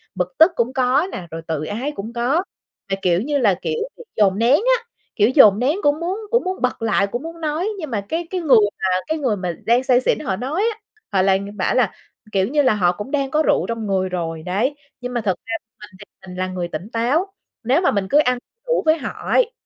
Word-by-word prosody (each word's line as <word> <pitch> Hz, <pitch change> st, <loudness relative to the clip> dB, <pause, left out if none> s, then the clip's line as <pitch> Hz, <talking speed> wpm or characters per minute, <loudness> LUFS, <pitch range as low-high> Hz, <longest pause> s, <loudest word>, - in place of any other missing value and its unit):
bực 180 Hz, 0 st, -2 dB
tức 325 Hz, +3 st, +7 dB
cũng 240 Hz, +2 st, 0 dB
có 265 Hz, +6 st, +2 dB
nè, 175 Hz, -2 st, -6 dB
rồi 165 Hz, 0 st, -5 dB
tự 155 Hz, -2 st, -2 dB
ái 245 Hz, -, -3 dB
cũng 220 Hz, +4 st, -6 dB
có. 255 Hz, +9 st, +1 dB, 0.5 s
Là 195 Hz, -, +1 dB
kiểu 175 Hz, 0 st, +2 dB
như 290 Hz, +3 st, 0 dB
là 215 Hz, -7 st, +3 dB
kiểu 465 Hz, -, -2 dB, 0.2 s
bị 485 Hz, -, -10 dB
dồn 200 Hz, -1 st, +3 dB
nén 235 Hz, +2 st, +3 dB, 0.3 s
á, 465 Hz, -, -13 dB, 0.3 s
kiểu, 210 Hz, +2 st, +4 dB
dồn 220 Hz, -6 st, +6 dB
nén 285 Hz, +9 st, +1 dB
cũng 290 Hz, +2 st, +2 dB
muốn 365 Hz, +5 st, -2 dB
cũng 475 Hz, -, +3 dB
muốn 370 Hz, +1 st, -3 dB
bật 250 Hz, -2 st, -1 dB
lại, 210 Hz, -3 st, +2 dB
cũng 240 Hz, +8 st, -5 dB
muốn 330 Hz, 0 st, -8 dB
nói, 315 Hz, +5 st, -1 dB
nhưng 310 Hz, -5 st, -5 dB
mà 210 Hz, -3 st, -1 dB
cái 330 Hz, +1 st, -2 dB
cái 370 Hz, -1 st, -2 dB
người 280 Hz, -7 st, +5 dB, 0.2 s
mà -, -, -2 dB, 0.2 s
cái 315 Hz, 0 st, -1 dB
người 255 Hz, -8 st, 0 dB
mà 180 Hz, -2 st, -3 dB
đang 240 Hz, +3 st, +3 dB
say 255 Hz, -1 st, +3 dB
xỉn -, -, +1 dB
họ 210 Hz, -11 st, -2 dB
nói 270 Hz, -, -2 dB
á, 425 Hz, -, -21 dB, 0.3 s
họ 190 Hz, -2 st, +3 dB
lại 190 Hz, 0 st, +3 dB, 0.2 s
bảo 185 Hz, -, 0 dB
là, 240 Hz, -7 st, +3 dB, 0.4 s
kiểu 190 Hz, -1 st, +1 dB
như 295 Hz, +3 st, +2 dB
là, 255 Hz, -5 st, +3 dB
họ 180 Hz, -4 st, +2 dB
cũng 205 Hz, +9 st, -7 dB
đang 275 Hz, -2 st, 0 dB
có 310 Hz, +1 st, +2 dB
rượu -, -, +2 dB
trong 230 Hz, -2 st, -3 dB
người 190 Hz, -1 st, 0 dB
rồi, 165 Hz, -3 st, -4 dB
đấy. 210 Hz, +11 st, 0 dB, 0.3 s
Nhưng 250 Hz, 0 st, -5 dB
mà 240 Hz, -, -1 dB
thực 195 Hz, -4 st, 0 dB
ra 225 Hz, -, -4 dB, 0.3 s
mình 210 Hz, -, -10 dB
thì 205 Hz, -, -11 dB, 0.2 s
mình 180 Hz, 0 st, -9 dB
là 185 Hz, -, -1 dB
người 180 Hz, -2 st, -3 dB
tỉnh 175 Hz, +6 st, -6 dB
táo, 270 Hz, +12 st, +1 dB, 0.4 s
nếu 265 Hz, +9 st, +2 dB
mà 360 Hz, -, +3 dB
mình 200 Hz, -2 st, -1 dB
cứ 290 Hz, -, +5 dB
ăn 250 Hz, -4 st, +2 dB, 0.3 s
đủ -, -, +1 dB
với 315 Hz, +1 st, +4 dB
họ 300 Hz, -, -5 dB, 0.2 s
ấy, -, -, +3 dB
245 Hz, 250 wpm, -21 LUFS, 195-300 Hz, 0.5 s, tức